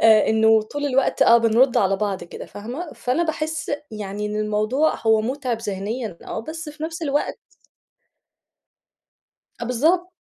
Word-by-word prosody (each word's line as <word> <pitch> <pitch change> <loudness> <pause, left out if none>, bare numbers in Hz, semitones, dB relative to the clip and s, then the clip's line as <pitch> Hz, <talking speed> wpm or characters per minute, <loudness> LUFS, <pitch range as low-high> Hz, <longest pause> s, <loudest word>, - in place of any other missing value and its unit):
آآ 220 -1 +6
إنه 220 0 +4
طول 290 +6 -4
الوقت 270 -1 +2
آه 235 - +7
بنرُد 230 +3 +3
على 195 0 +3
بعض 200 -2 -2
كده - - -9
فاهمة؟ 255 +11 -7
فأنا 255 +7 0
باحس 315 -1 -3 0.2
يعني 210 -1 -4
إن 210 - -3
الموضوع 215 +8 +1
هو 220 -1 +5
مُتعب 250 0 -2
ذهنيًا 210 0 -4
آه 220 - -4
بس 315 +5 -7
في 300 +1 -10
نفس 330 +1 -4
الوقت 290 -1 -1 2.2
أ - - -2
بالضبط. 325 +10 +1
235 Hz, 145 wpm, -22 LUFS, 215-295 Hz, 2.2 s, آه